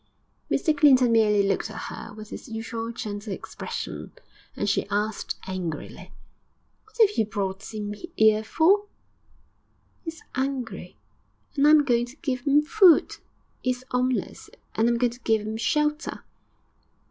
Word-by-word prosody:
Mr 310 -4 +2
Clinton 265 -5 +5
merely 210 -3 +4
looked 200 - 0
at 215 - -8
her - - -7
with 215 0 -11
his - - -8
usual 225 0 -4
gentle 210 -2 -6
expression, - - -6 0.4
and - - -2
she 200 - +1
asked 210 +1 -2
angrily, 185 -4 -5 0.7
'What 435 +1 -21
'ave 425 -2 +6
you - - +1
brought 195 -2 -4
'im 210 -1 -4 0.2
'ere 220 0 +5
for?' 390 - +3 1.2
''E - - -22
is 325 0 -6
'ungry, 260 -3 -3 0.6
and 285 0 +4
I - - +7
am 305 -1 +7
going 240 -3 +1
to 250 - -13
give 270 -4 -4
'im 290 +2 +5
food; 350 +1 +5 0.5
'e 255 - 0
is 255 0 -2
'omeless, 250 0 -1 0.2
and 225 - +2
I - - +3
am 235 - +1
going 245 0 +2
to 245 - -14
give 225 -3 +1
'im 215 +1 -4
shelter.' 300 +5 -1
235 Hz, 155 wpm, -25 LUFS, 215-290 Hz, 1.2 s, I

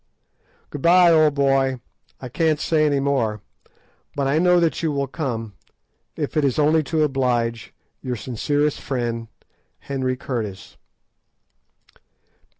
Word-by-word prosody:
Good 145 - -6
bye, 175 +1 +6
old 155 -3 +4
boy; 135 -2 +1 0.4
I 130 - -7
can't 155 +4 0
say 155 -1 +2
any 145 -1 +1
more, 130 -6 0 0.8
but 140 - -1
I 140 +3 +2
know 180 0 +4
that 165 -2 0
you 160 -2 0
will 140 -1 -1
come, 120 -7 -4 0.6
if 150 0 -4
it 155 - +2
is 135 -3 +1
only 155 +1 +3
to 160 0 0
oblige 120 -5 -1 0.3
Your 125 -1 -3
sincere 145 +6 -1
friend, 120 -5 -4 0.5
HENRY 130 -2 -2
CURTIS. 110 -8 -6
140 Hz, 130 wpm, -22 LUFS, 125-155 Hz, 0.8 s, bye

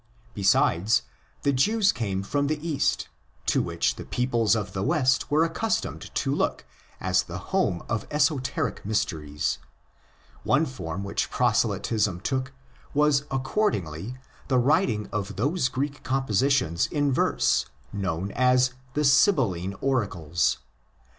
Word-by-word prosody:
Besides, 100 -1 +3 0.4
the 140 - +2
Jews 200 - +3
came 100 -6 -2
from 140 +7 0
the 155 +1 0
Kast, 150 -2 -1 0.4
to - - +2
which - - -1
the - - -6
peoples 120 -4 +1
of 100 -4 -3
the 95 - -2
West 130 +5 +2
were 155 +3 +3
accus 190 +7 0
tomed - - -7
to - - 0
look - - -1 0.3
as - - +2
the - - -7 0.2
home 140 - +1
of 110 -2 -2
esoteric 145 -3 0
mysteries. 75 - -1 0.8
One 160 - +3
form 95 - -5
which 100 - -2
proselytism 105 -6 +1
took 130 +4 -2 0.4
was 145 -1 +3
accordingly 125 - -1 0.3
the 130 - +2
writing 125 - +2
of 105 -1 -3
those 140 - +1
Greek 140 +3 -3
compositions 130 - +1
in 145 -2 0
verse 70 - +2 0.3
known 95 -1 -2
as 125 +1 +3 0.2
the 150 - +1
Sibylline 125 - +3
Oracles. 95 - 0
125 Hz, 125 wpm, -26 LUFS, 100-145 Hz, 0.8 s, Besides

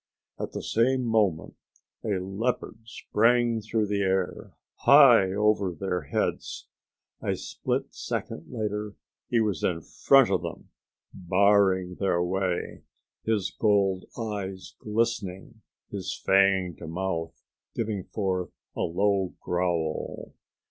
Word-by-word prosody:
At - - -4
the - - -5
same 130 +3 +2
moment 105 -8 0 0.5
a 105 -4 0
leopard 105 +4 -3
sprang 115 0 +2
through 110 0 0
the 100 0 -1
air, 95 -2 -1 0.2
high 125 -9 +7
over 105 -2 +1
their 90 -1 -2
heads. - - -2 0.6
A - - -1
split - - -3
second 75 - -5
later 105 -3 -3 0.3
he 120 - +3
was 105 -5 0
in 85 -2 0
front - - +4
of - - +2
them, - - -8 0.4
barring 95 -1 +2
their 90 -3 +1
way, 90 0 -2 0.4
his 110 -4 0
gold 100 -3 +2
eyes 100 -4 -5
glistening, 110 -1 -2 0.3
his 100 -3 -4
fanged 95 -4 +3
mouth 85 -1 -3 0.4
giving 105 -4 -2
forth 95 -4 -2 0.3
a - - -6
low 95 +2 +1
growl. 85 -3 -2
100 Hz, 115 wpm, -27 LUFS, 90-110 Hz, 0.6 s, high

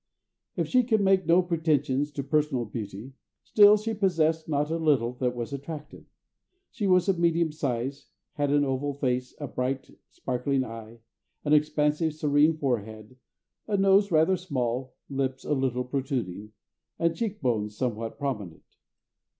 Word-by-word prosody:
If - - -1
she 255 - +4
could 225 -3 +1
make 195 -2 +3
no 175 +2 +5
pretensions 150 -4 0
to 140 - -3
personal 145 -4 0
beauty, 105 +3 -7 0.3
still 210 0 +6
she 220 +2 -3
possessed 165 -6 +1
not 150 +1 0
a 165 - -1
little 135 -7 +2
that 125 -1 0
was 120 +2 -5
attractive. 150 +2 -8 0.6
She 210 -4 -2
was 185 -1 +4
of 190 -3 +1
medium 170 -1 +2
size, 135 -2 -3 0.3
had 145 -2 -1
an 145 0 +3
oval 135 +1 -2
face, 125 -2 -2
a 145 - -4
bright, 130 +2 -3 0.2
sparkling 130 +1 -1
eye, 115 0 -10 0.4
an 150 - +2
expansive, 150 +1 +2
serene 150 +1 +3
forehead, 110 -4 -3 0.5
a 205 -2 0
nose 195 +1 +4
rather 165 +2 +3
small, 130 -7 -3
lips 135 -1 -3
a - - 0
little 130 -2 0
protruding, 125 - -4 0.4
and 170 0 +1
cheek 210 -3 -3
bones 105 -6 -1
somewhat 115 -3 -3
prominent. 105 - -4
145 Hz, 150 wpm, -27 LUFS, 125-165 Hz, 0.6 s, still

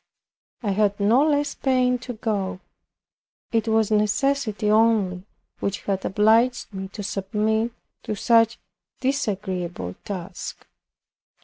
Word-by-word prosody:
I 205 - 0
had 205 0 +1
no 225 +7 +4
less 290 -1 +1
pain 255 -2 +1
to 250 0 -6
go. 205 -5 -2 0.9
It 225 0 +1
was 220 -1 +2
necessity 215 0 +1
only 210 -5 +3 0.3
which 200 0 -2
had 195 -1 -1
obliged 225 +4 +3
me 190 0 -5
to 205 - -6
submit 215 +4 0 0.3
to 215 - -4
such 230 +2 +4
a - - -36 0.4
disagreeable 190 - -2
task. 190 -3 -6
215 Hz, 115 wpm, -24 LUFS, 195-235 Hz, 0.9 s, no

